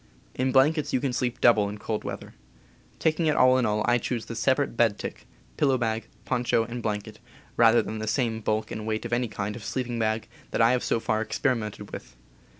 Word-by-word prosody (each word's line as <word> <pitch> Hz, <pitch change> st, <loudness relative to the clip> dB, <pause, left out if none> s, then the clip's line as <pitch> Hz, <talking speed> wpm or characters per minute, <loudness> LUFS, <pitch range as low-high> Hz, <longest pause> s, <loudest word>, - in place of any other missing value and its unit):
In 130 Hz, +1 st, 0 dB
blankets 145 Hz, +4 st, +3 dB
you 130 Hz, -, +3 dB
can 130 Hz, -1 st, -1 dB
sleep 125 Hz, 0 st, -1 dB
double 105 Hz, -4 st, +4 dB
in 105 Hz, -, -6 dB
cold 105 Hz, +1 st, -3 dB
weather. -, -, -7 dB, 0.6 s
Taking 160 Hz, 0 st, +1 dB
it 150 Hz, -, +2 dB
all 130 Hz, 0 st, +5 dB
in 120 Hz, -, +1 dB
all, 105 Hz, 0 st, 0 dB
I 120 Hz, 0 st, +4 dB
choose 115 Hz, -2 st, -3 dB
the 115 Hz, -, -7 dB
separate 130 Hz, +3 st, +1 dB
bed 115 Hz, -3 st, +3 dB
tick, -, -, -7 dB, 0.3 s
pillow 135 Hz, -3 st, +3 dB
bag, 115 Hz, -2 st, -2 dB, 0.2 s
pon 125 Hz, -1 st, 0 dB
cho, 115 Hz, -1 st, +2 dB
and 120 Hz, +1 st, -6 dB
blanket, 105 Hz, -1 st, -4 dB, 0.4 s
rather 115 Hz, 0 st, +5 dB
than 110 Hz, -, -5 dB
the 110 Hz, -, -4 dB
same 115 Hz, -1 st, 0 dB
bulk 110 Hz, +1 st, -1 dB
and 110 Hz, 0 st, -5 dB
weight 110 Hz, +1 st, -2 dB
of 120 Hz, -, -3 dB
any 120 Hz, 0 st, +1 dB
kind 105 Hz, -1 st, -4 dB
of 120 Hz, -, -9 dB
sleeping 120 Hz, +2 st, -3 dB
bag 110 Hz, 0 st, 0 dB, 0.2 s
that -, -, -2 dB
I 115 Hz, +1 st, +5 dB
have 125 Hz, -1 st, +1 dB
so -, -, +1 dB
far 110 Hz, -1 st, 0 dB
experimented 110 Hz, -4 st, -2 dB
with. -, -, -9 dB
115 Hz, 220 wpm, -26 LUFS, 110-125 Hz, 0.6 s, all